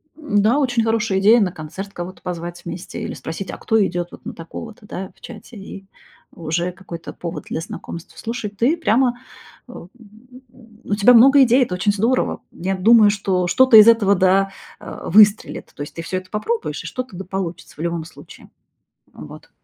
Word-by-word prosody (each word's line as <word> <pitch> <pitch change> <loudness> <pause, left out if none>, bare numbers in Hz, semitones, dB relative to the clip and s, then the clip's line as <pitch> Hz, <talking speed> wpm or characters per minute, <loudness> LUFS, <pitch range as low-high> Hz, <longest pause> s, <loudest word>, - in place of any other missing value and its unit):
М-да, 235 -3 +1
очень 245 -4 +1
хорошая 220 -3 0
идея- 215 +5 +6
на 190 -3 +1
концерт 180 +4 -8
кого-то 175 +1 -8
позвать 175 0 -6
вместе 170 +1 -7
или - - -5
спросить: 165 +5 -6
"А - - -8
кто 220 -2 +1
идет 175 -1 -3
вот - - -14
на - - -6
такого-то?", 210 +6 -10
Да, 190 -1 -7
в - - -29
чате, 235 0 -11
и 195 0 -10 0.5
уже 170 +2 -2
какой-то 170 -3 -10
повод 170 -1 -7
для - - -3
знакомства. 170 +1 -9
Слушай, 230 -2 -5
ты 235 +10 +1
прямо 245 -4 +1 0.5
э, - - -9
м, 175 - -11 0.9
у 205 - -2
тебя 215 +4 +5
много 270 +4 +7
идей, 255 +1 +4
это 185 -7 -3
очень 205 +3 +1
здорово. 230 +6 0
Я 190 +2 -3
думаю, 215 +2 +6
что 190 -3 -1
что-то 255 +4 +6
из 215 +1 +9
этого 225 -4 +5
да, 195 +1 +2 0.3
э, - - -9
выстрелит. 210 +3 +3
То - - -9
есть - - -11
ты 165 - -5
все 185 +3 -4
это 185 0 -8
попробуешь, 450 - -3
и - - -7
что-то 255 -6 -6
да 190 - -6
получится 185 -2 -6
в - - -21
любом 170 0 -2
случае. 165 - -15 0.6
Вот. - - -12
200 Hz, 185 wpm, -20 LUFS, 180-230 Hz, 0.9 s, из